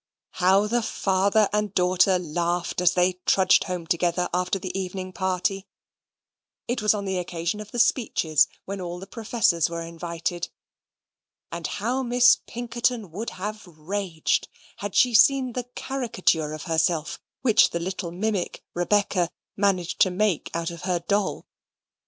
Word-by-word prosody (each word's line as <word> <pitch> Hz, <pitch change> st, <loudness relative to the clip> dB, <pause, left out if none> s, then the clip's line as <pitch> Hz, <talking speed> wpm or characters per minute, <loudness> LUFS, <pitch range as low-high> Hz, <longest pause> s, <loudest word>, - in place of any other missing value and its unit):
How 190 Hz, +3 st, +5 dB
the 235 Hz, +3 st, +1 dB
father 200 Hz, 0 st, +2 dB
and 210 Hz, -1 st, -1 dB
daughter 180 Hz, +1 st, +3 dB
laughed 175 Hz, +1 st, -2 dB
as 180 Hz, +1 st, +3 dB
they 180 Hz, 0 st, +2 dB
trudged 190 Hz, -1 st, +4 dB
home 180 Hz, -3 st, -4 dB
together 175 Hz, +1 st, 0 dB
after 180 Hz, +2 st, 0 dB
the 185 Hz, -1 st, -6 dB
evening 185 Hz, -1 st, -4 dB
party 190 Hz, +1 st, -1 dB, 1.0 s
(it 245 Hz, -1 st, -1 dB
was 210 Hz, 0 st, +3 dB
on 200 Hz, -1 st, -4 dB
the 190 Hz, -1 st, -1 dB
occasion 175 Hz, +3 st, -3 dB
of 210 Hz, -1 st, -8 dB
the -, -, -7 dB
speeches, 220 Hz, -, +3 dB, 0.2 s
when 195 Hz, 0 st, -5 dB
all 175 Hz, 0 st, -5 dB
the 185 Hz, -, -8 dB
professors 215 Hz, -7 st, +1 dB
were 170 Hz, 0 st, -4 dB
invited) 170 Hz, +1 st, -4 dB, 1.0 s
and -, -, -4 dB
how 240 Hz, +6 st, -2 dB
Miss 245 Hz, 0 st, +5 dB
Pinkerton 235 Hz, -4 st, -2 dB
would 215 Hz, +7 st, -4 dB
have 210 Hz, +1 st, -5 dB
raged 170 Hz, +1 st, -2 dB, 0.3 s
had 205 Hz, -2 st, -5 dB
she 250 Hz, -1 st, +4 dB
seen 255 Hz, +2 st, +5 dB
the 250 Hz, 0 st, -3 dB
caricature 225 Hz, -, 0 dB
of 155 Hz, -1 st, -6 dB
herself 160 Hz, -2 st, 0 dB, 0.2 s
which 230 Hz, -5 st, +5 dB
the 170 Hz, -, -3 dB
little 180 Hz, 0 st, -4 dB
mimic, 190 Hz, +1 st, -2 dB
Rebecca, 180 Hz, -1 st, +1 dB, 0.3 s
managed 195 Hz, -4 st, 0 dB
to 185 Hz, -, +6 dB
make 185 Hz, -2 st, 0 dB
out 170 Hz, 0 st, -2 dB
of 170 Hz, -, -9 dB
her 180 Hz, -1 st, 0 dB
doll. 200 Hz, +4 st, -1 dB
185 Hz, 150 wpm, -25 LUFS, 175-210 Hz, 1.0 s, to